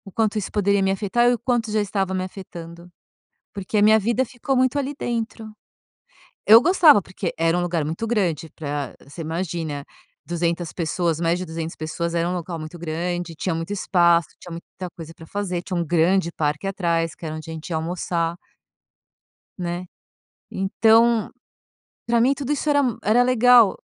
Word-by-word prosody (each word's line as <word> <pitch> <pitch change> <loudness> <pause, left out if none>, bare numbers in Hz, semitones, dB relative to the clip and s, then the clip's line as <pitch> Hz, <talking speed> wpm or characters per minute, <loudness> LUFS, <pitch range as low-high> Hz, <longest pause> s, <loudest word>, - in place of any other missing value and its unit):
quanto 220 -1 +1
isso 205 - -3
poderia 200 -1 +2
me 190 0 +2
afetar 220 +5 +2
e - - +3
o 240 - -2
quanto 235 -3 -1
já 215 - +1
estava 195 -1 -1
me 185 0 -1
afetando, 170 -2 -10 0.6
porque 200 +1 -3
a - - +4
minha 220 +1 +6
vida 235 +5 +1
ficou 260 +3 -3
muito 260 +2 +2
ali 280 +1 -3
dentro. 225 -1 -3 1.0
Eu 225 +3 +9
gostava, 325 - +6
porque 185 -1 -5
era 165 +1 +2
um - - +1
lugar 170 -4 -1
muito 165 +9 -3
grande 175 -8 -1
pra 145 -2 -4
você 165 +4 -9
imagina 160 -3 -3 0.4
200 170 0 -2
pessoas, 165 -1 -1
mais 170 +1 +1
de 185 - -4
200 160 0 -5
pessoas, 170 +2 -4
era 170 +1 +1
um - - -1
local 175 -1 -4
muito 155 +3 -8
grande, 175 +1 -3
tinha 185 +1 -2
muito 165 +4 -4
espaço, 170 -3 +3
tinha 175 - -11
muita 175 +2 -8
coisa 165 -1 -9
para 165 - -13
fazer, 185 -4 -3
tinha 185 - -4
um 170 - +1
grande 170 +2 +2
parque 150 +5 -2
atrás 170 -4 -1
que 165 - -10
era 155 0 -4
onde 155 +1 -8
a - - -5
gente 160 +2 -8
ia 165 - -2
almoçar 170 0 -2 1.2
né, 175 +1 -4 0.6
então, 225 +3 +3 0.8
pra 235 0 +3
mim 265 +3 +4
tudo 280 0 -4
isso 295 +1 -1
era 285 -1 +4
m 245 -5 -1
era 230 +4 +4
legal 245 -3 +5
180 Hz, 180 wpm, -23 LUFS, 165-220 Hz, 1.2 s, Eu